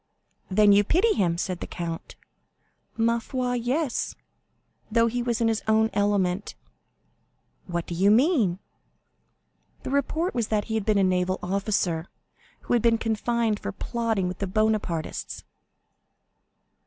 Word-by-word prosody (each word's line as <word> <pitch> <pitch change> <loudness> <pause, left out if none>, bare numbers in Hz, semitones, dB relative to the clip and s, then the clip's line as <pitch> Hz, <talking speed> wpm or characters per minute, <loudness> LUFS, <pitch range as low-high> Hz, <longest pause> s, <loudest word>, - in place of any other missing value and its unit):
"Then 205 +2 +5
you 200 +1 +6
pity 375 - +3
him?" 175 -5 +1
said 180 0 -3
the - - -6
count. 170 -2 -6 0.8
"Ma 230 +1 +2
foi, 250 +1 -2
yes; 250 +4 -1 0.8
though 230 +1 +4
he 240 +1 -1
was 235 -2 -1
in 230 - +3
his 225 -1 0
own 220 0 +3
element." 200 -2 0 1.1
"What 170 -2 -3
do - - -6
you 190 +4 +3
mean?" 230 - +3 1.3
"The - - -5
report 315 +5 0
was 235 -3 -1
that 210 -1 0
he 220 - -5
had 220 -3 -1
been 215 -2 +2
a 195 - +3
naval 185 0 +1
officer, 185 -3 -1 0.5
who - - -2
had 240 - +3
been 230 0 +3
confined 225 0 0
for 205 - -4
plotting 225 -2 -2
with 180 0 -5
the 200 - -2
Bonapartists." 210 -5 -1
215 Hz, 140 wpm, -26 LUFS, 190-235 Hz, 1.3 s, you